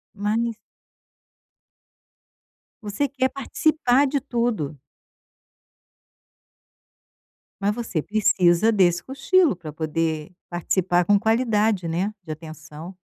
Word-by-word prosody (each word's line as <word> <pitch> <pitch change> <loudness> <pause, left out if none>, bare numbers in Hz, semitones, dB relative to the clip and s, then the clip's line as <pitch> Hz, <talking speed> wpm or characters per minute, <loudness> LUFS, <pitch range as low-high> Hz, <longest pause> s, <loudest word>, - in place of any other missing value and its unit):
Mas 220 +3 -1 2.3
Você 210 +8 -1
quer 260 -1 0
participar 275 -1 +1
de 280 +1 0
tudo. 235 - -2 2.8
Mas 205 +1 +1
você 220 -9 -3
precisa 195 0 +3
desse 175 -4 +2
cochilo 315 - +2
para 165 -3 -9
poder 155 +1 -2 0.2
participar 175 0 +1
com 205 +3 +4
qualidade, 220 -4 +1
né, 185 +6 -1
de 160 - -7
atenção. 155 +2 -9
200 Hz, 85 wpm, -23 LUFS, 170-235 Hz, 2.8 s, com